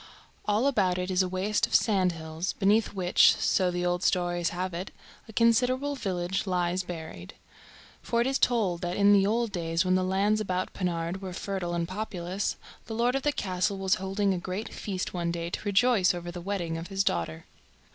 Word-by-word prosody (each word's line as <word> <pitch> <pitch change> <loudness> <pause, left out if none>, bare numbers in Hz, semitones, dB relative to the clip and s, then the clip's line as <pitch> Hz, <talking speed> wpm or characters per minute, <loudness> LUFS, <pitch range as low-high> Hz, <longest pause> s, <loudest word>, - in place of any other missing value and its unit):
All 210 +4 +2
about 195 -10 +2
it 180 +1 -2
is 185 0 +3
a 185 - +1
waste 190 +3 0
of - - -1
sandhills, 175 -4 +1
beneath 210 +3 +2
which, 180 -2 +5
so 185 -2 +2
the 175 0 -2
old 175 0 0
stories 175 -2 +1
have 185 +1 -3
it, 180 +3 -4 0.4
a - - -7
considerable 250 +5 +2
village 190 -4 -2
lies 180 0 0
buried. 160 - -8 0.7
For 235 - -1
it 235 - +3
is 270 +1 0
told 200 -8 +1
that 175 0 -2
in 205 0 +6
the 195 -1 +4
old 230 +1 0
days, 165 -2 -1
when 185 - +2
the 185 0 +2
lands 200 +3 +1
about 185 -2 -2
Pennard 175 0 -2
were 185 -2 -6
fertile 180 -2 -3
and 170 -1 -1
populous, 185 -1 -3 0.3
the 220 - -5
lord 240 +2 +2
of 270 - 0
the 295 - +1
castle 195 -4 -1
was 190 0 +1
holding 195 +1 0
a 180 - -2
great 185 +5 -5
feast 190 -3 -4
one 170 -2 -1
day 170 0 -3
to - - -3
rejoice 205 -2 +3
over 175 0 -6
the 175 0 -7
wedding 170 -4 -3
of 165 - -7
his 195 0 0
daughter. 80 - -2
185 Hz, 195 wpm, -28 LUFS, 175-205 Hz, 0.7 s, in